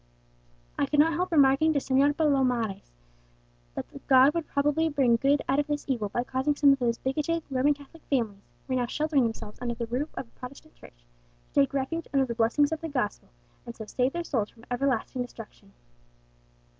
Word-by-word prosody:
I - - +2
could 295 - +1
not 320 +2 +5
help 360 +4 -1
remarking 290 +1 +4
to 285 - +2
Señor 275 +2 +2
Palomares 255 - 0 0.9
that - - -4 0.2
God 265 +1 +6
would 335 -2 -3
probably 295 +3 +1
bring 270 -5 +3
good 280 +4 +2
out 275 +2 +2
of 290 - 0
this 295 -1 -3
evil, 235 -7 -1
by 240 - -1
causing 265 +3 -1
some 285 -1 +5
of 275 - -2
those 235 -2 0
bigoted 305 +5 -1
Roman 270 +3 +2
Catholic 290 +3 -16
families, 225 -7 -1 0.2
who - - -3
were 255 - +1
now 240 - -1
sheltering 300 +1 +1
themselves 225 -2 -6
under 240 -1 -2
the 235 0 -3
roof 250 +7 -3
of 260 - -5
a - - -32
Protestant 280 +5 -11
church, - - -18 0.5
to - - +5
take 275 - 0
refuge 315 +5 -2
under 270 -1 +4
the 240 - -4
blessings 235 +6 +2
of 320 0 -3
the 325 - -4
gospel, 255 -8 -3 0.4
and 235 - -7
so 220 - -8
save 250 +4 -1
their 345 - -3
souls 225 -10 -1
from 230 +1 -19
everlasting 255 -1 -1
destruction. 225 -4 -10
270 Hz, 200 wpm, -27 LUFS, 240-295 Hz, 0.9 s, God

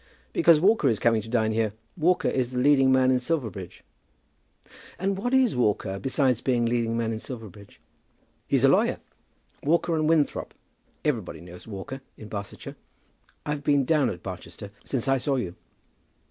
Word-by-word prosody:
"Because 165 -3 +5
Walker 195 -3 +3
is 115 -4 +2
coming 115 0 +2
to 110 - -10
dine 110 -2 +1
here. 110 -1 0 0.2
Walker 175 +2 +2
is 130 -2 0
the 125 - -2
leading 135 0 +4
man 130 0 +4
in 130 - +3
Silverbridge." 120 - -4 1.1
"And 195 +2 -1
what 230 +6 -2
is 260 -3 +3
Walker; 105 -5 0
besides 130 -2 +1
being 120 -3 +1
leading 115 -1 0
man 115 -1 -1
in 110 - -3
Silverbridge?" 110 -5 -10 0.7
"He's - - +2
a - - +7
lawyer. - - +3 0.6
Walker 170 +3 +1
and 155 -1 +1
Winthrop. 155 -3 +1 0.5
Everybody 110 - -1
knows 90 +3 -12
Walker 110 +6 -7 0.2
in 110 - -10
Barsetshire. 100 -1 -7 0.7
I've 150 -1 -3
been 145 -2 +3
down 150 -3 +2
at 90 - -7
Barchester 90 +2 -8
since 130 0 -2
I 135 0 +3
saw 140 +2 0
you." 95 -9 -3
125 Hz, 160 wpm, -26 LUFS, 110-145 Hz, 1.1 s, a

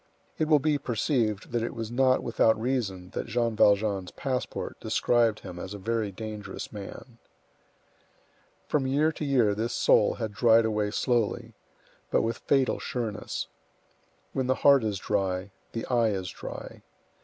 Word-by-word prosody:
It 155 - +1
will 155 -1 +6
be 150 0 +1
perceived 115 -4 -1
that 120 - 0
it 115 - -3
was 115 -1 -5
not 130 +1 +3
without 115 -1 +2
reason 110 -7 -2
that - - -4
Jean 115 -2 0
Valjean's 100 -3 +3
passport 130 -2 -4
described 115 -3 +2
him 90 - -8
as 95 +3 -6
a - - -6
very 110 +1 -1
dangerous 105 0 -7
man. 110 +4 -9 1.5
From 135 -3 +1
year 150 +4 +2
to 155 - -6
year 125 -8 +3
this 115 +3 -2
soul 105 - +4
had 110 -3 -4
dried 115 +1 +5
away 105 -1 0
slowly, 115 0 0 0.6
but - - +2
with 115 +1 -2
fatal 135 -2 +1
sureness. 115 -5 -3 0.9
When 130 -1 -1
the 130 - +2
heart 140 -3 +7
is 105 -2 -1
dry, 95 -1 -1 0.2
the 115 - -3
eye 120 -3 +2
is 95 -2 -3
dry. - - -8
115 Hz, 155 wpm, -28 LUFS, 105-125 Hz, 1.5 s, heart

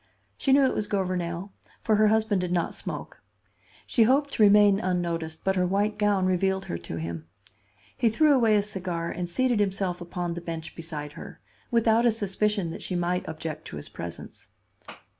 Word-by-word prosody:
She 270 - 0
knew 275 0 +6
it 260 - +1
was 210 - -2
Gouvernail, 185 -1 -2 0.3
for 220 - +3
her 215 0 +5
husband 215 -2 +2
did 180 -1 -3
not 175 -2 0
smoke. - - -7 0.6
She 235 - +1
hoped 275 +5 +4
to - - -1
remain 205 -1 +6
unnoticed, 170 -4 -2
but 190 0 +1
her 180 -1 +2
white 205 +3 0
gown 205 -3 +2
revealed 190 +1 +1
her 85 - -4
to 85 -1 -7
him. 80 0 -5 0.7
He 230 - +2
threw 295 +7 +4
away 230 -5 +4
his 205 0 +1
cigar 175 -4 -3
and 175 -1 -4
seated 245 +4 +1
himself 190 -3 -1
upon 175 0 -4
the 170 - -6
bench 165 -2 -6
beside 150 -3 -6
her; - - -10 0.3
without 230 0 +3
a - - +5
suspicion 205 -3 -1
that - - -7
she 185 - -4
might 175 +1 -1
object 160 0 -6
to - - -8
his 75 - -8
presence. 85 -1 -9
190 Hz, 185 wpm, -26 LUFS, 170-215 Hz, 0.7 s, knew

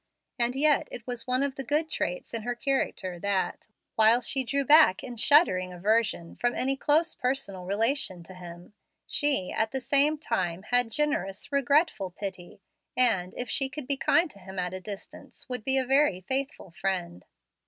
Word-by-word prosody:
And 240 +1 +1
yet 295 +1 +3
it 230 - -8
was 245 -1 -5
one 255 +2 +1
of 280 -1 -1
the 270 - -5
good 300 +3 0
traits - - -3
in 230 - -1
her 245 +2 -3
character, 235 -9 -2
that, 200 0 -2 0.3
while 220 +2 +5
she 265 +2 0
drew 275 +3 -1
back 300 -9 +6
in 245 -2 -7
shuddering 225 - +4
aversion 200 -1 0
from 245 0 0
any 270 +1 +1
dose 305 +5 +2
personal 250 -8 -3
relation 205 -2 -1
to 185 - -13
him, 175 +1 -11 0.3
she 285 -11 0
at 220 - 0
the 265 - -3
same 285 +4 +2
time 185 - -2
bad 245 -1 +3
generous, 290 -8 -2
regretful 280 - +2
pity, 185 0 -8 0.3
and, 190 -8 +2
if 245 - -4
she 270 +1 0
could 270 +1 -7
be 280 +2 0
kind 325 +4 +2
to 200 - -15
him 190 0 -11
at 180 0 -2
a 185 - -6
distance, 200 +1 -10
would 250 -3 -5
be 265 +3 +2
a 260 - +1
very 270 -7 +2
faithful 265 - -3
friend. 170 - -4
245 Hz, 180 wpm, -27 LUFS, 190-275 Hz, 0.3 s, back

